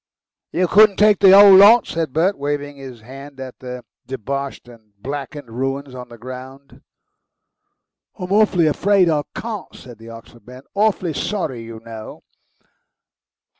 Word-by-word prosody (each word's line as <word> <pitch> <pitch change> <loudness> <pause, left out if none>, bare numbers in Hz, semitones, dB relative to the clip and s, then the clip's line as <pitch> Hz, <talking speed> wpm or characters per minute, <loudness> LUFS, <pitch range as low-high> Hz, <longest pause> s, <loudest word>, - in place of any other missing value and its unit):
"You 180 +1 0
couldn't 210 +2 +5
take 210 -1 +4
the 195 -1 +7
whole 200 -1 +8
lot?" 210 +5 +7
said 165 -3 -4
Bert, 175 +8 +1
waving 145 0 -4
his 130 -4 -11
hand 135 +4 -12
at 130 -1 -9
the 125 -1 -9 0.2
deboshed 135 +2 -6
and 110 -3 -18
blackened 140 +2 -7
ruins 135 +3 -4
on 125 -1 -10
the 120 - -13
ground. 130 +3 -11 1.4
"I'm 180 +1 -7
awfully 200 -5 +3
afraid 185 +3 +2
I 150 -2 0
can't," 220 -3 -7
said 120 -4 -13
the 115 +1 -13
Oxford 115 +1 -14
man. 125 +1 -12
"Awfully 200 -5 0
sorry, 150 - -4
you 115 -1 -10
know." 110 -1 -10
140 Hz, 145 wpm, -19 LUFS, 125-185 Hz, 1.4 s, whole